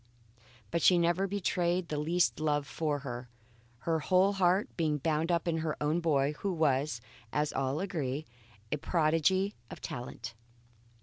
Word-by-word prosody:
But 170 - 0
she 180 - +6
never 175 +3 +2
betrayed 180 -2 0
the 150 - -1
least 170 +3 +1
love 150 -2 +1
for 150 0 -1
her, 120 -1 -5 0.5
her 165 +3 +1
whole 185 +5 +3
heart 190 +1 +3
being 155 -3 +1
bound 160 +3 0
up 170 0 +1
in 165 -1 +1
her 160 -1 -1
boy, 150 -2 +2
who 200 - -1
was, 145 -5 +1 0.3
as 150 0 0
all 135 +2 0
agree, 155 -7 -2 0.5
a - - +1
prodigy 165 +5 +2 0.2
of - - -8
talent. 120 -1 -6
160 Hz, 145 wpm, -31 LUFS, 150-175 Hz, 0.5 s, she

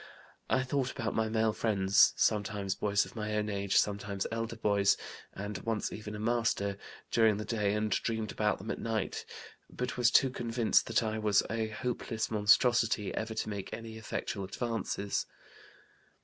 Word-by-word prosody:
I 130 - +2
thought 130 0 -1
about - - -3
my 110 0 0
male 110 0 +2
friends 100 -3 +4
sometimes 105 -2 +1
boys 100 0 +1
of - - -13
my 105 -1 -3
own 105 0 0
age, 100 -1 0
sometimes 100 -1 0
elder 115 0 -3
boys, 100 -2 +3 0.3
and 100 0 -5
once 115 -2 -2
even 105 0 -6
a - - -6
master 110 -3 0 0.3
during 110 -3 +4
the 105 - -4
day 105 -3 0
and 105 0 -1
dreamed 110 +1 -1
about 105 -1 +1
them 105 +4 -5
at - - -4
night, 115 -3 -2 0.4
but 125 0 -4
was 120 -1 +5
too 130 +2 +4
convinced 115 -2 +1
that 115 +1 +2
I 110 0 -2
was 105 -2 +3
a 110 -1 -1
hopeless 110 0 -3
monstrosity 110 0 +3
ever 110 0 -3
to 110 - -2
make 100 -2 -5
any 115 0 -7
effectual 105 -2 -4
advances. 100 -1 -2
110 Hz, 165 wpm, -31 LUFS, 100-115 Hz, 0.4 s, was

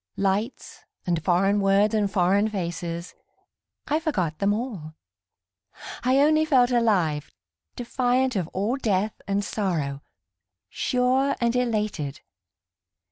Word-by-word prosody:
Lights 200 +5 -2 0.2
and 170 -3 -1
foreign 195 +3 +2
words 200 +2 +3
and 210 -2 +1
foreign 195 +2 +2
faces, 175 -3 -4 0.7
I 305 +1 +1
forgot 185 - -2
them 200 0 +2
all; 205 -9 -4 1.1
I 255 +2 +3
only 310 +1 +4
felt 260 -5 +3
alive, 185 -11 +1 0.5
defiant 250 +1 0
of 180 -5 -1
all 205 +9 -2
death 210 -4 -1
and 200 0 0
sorrow, 155 -11 -2 0.7
Sure 260 +2 +1
and 235 0 +1
elated. 210 - -1
205 Hz, 110 wpm, -25 LUFS, 180-245 Hz, 1.1 s, only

